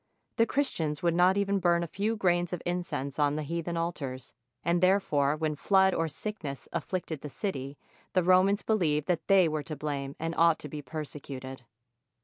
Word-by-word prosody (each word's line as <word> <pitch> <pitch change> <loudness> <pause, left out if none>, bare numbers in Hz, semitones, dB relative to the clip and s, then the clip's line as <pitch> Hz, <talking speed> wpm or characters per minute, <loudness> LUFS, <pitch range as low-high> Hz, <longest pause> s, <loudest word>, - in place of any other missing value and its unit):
The 230 -1 +4
Chris 285 0 +1
tians 150 -1 -3
would 170 -1 +3
not 180 +3 +4
even 200 0 +1
burn 170 -1 +3
a - - -3
few 210 +7 -1
grains 175 -3 +1
of 180 - -4
incense 160 -6 -3
on 145 0 +3
the 155 - -2
heathen 170 +2 -3
altars; 140 -7 -4 0.3
and 170 +1 +2
therefore 155 -7 +3
when 155 -1 -1
flood 190 +4 +4
or 165 - 0
sickness 155 -3 -6
afSicted 170 -5 -3
the 150 - -6
city, 140 -5 -4 0.4
the 185 - +3
Romans 185 +3 +4
believed 155 -9 +1
that 175 -2 -1
they 195 -3 +6
were 155 -1 -1
to 155 +1 -6
blame 140 -2 -4
and 165 +1 -3
ought 165 -1 +5
to 150 - -8
be 150 +1 -6
persecuted. 135 -3 -7
165 Hz, 185 wpm, -29 LUFS, 150-185 Hz, 0.4 s, they